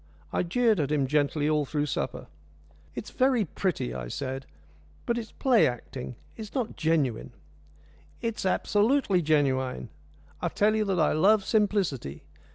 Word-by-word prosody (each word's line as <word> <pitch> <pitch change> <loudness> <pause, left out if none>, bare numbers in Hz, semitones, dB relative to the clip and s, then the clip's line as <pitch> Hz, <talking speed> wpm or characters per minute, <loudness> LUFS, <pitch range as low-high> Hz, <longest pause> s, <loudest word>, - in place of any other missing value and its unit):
I - - +1
jeered 220 +3 +2
at 145 -1 0
him 145 -3 +2
gently 145 +1 +1
all 150 -1 +2
through 145 +1 -1
supper. 145 - -3 0.7
"It's - - -6
very 255 -4 +2
pretty," 170 -6 -2
I 60 -2 -5
said, 135 - -5 0.6
"but 235 - 0
it 235 - -1
is 225 - -12
play 250 -5 +4
acting. 125 +1 -6 0.2
It's 220 +1 -9
not 245 -4 -2
genuine." 150 -7 0 0.9
"It 230 -2 -3
is - - -3
absolutely 205 0 +2
genuine. 135 -6 +1 0.5
I - - 0
tell 215 +1 +2
you 215 -1 +1
that 190 -3 0
I 155 - +3
love 200 +5 +4
simplicity. 195 - 0
165 Hz, 155 wpm, -27 LUFS, 140-215 Hz, 0.9 s, play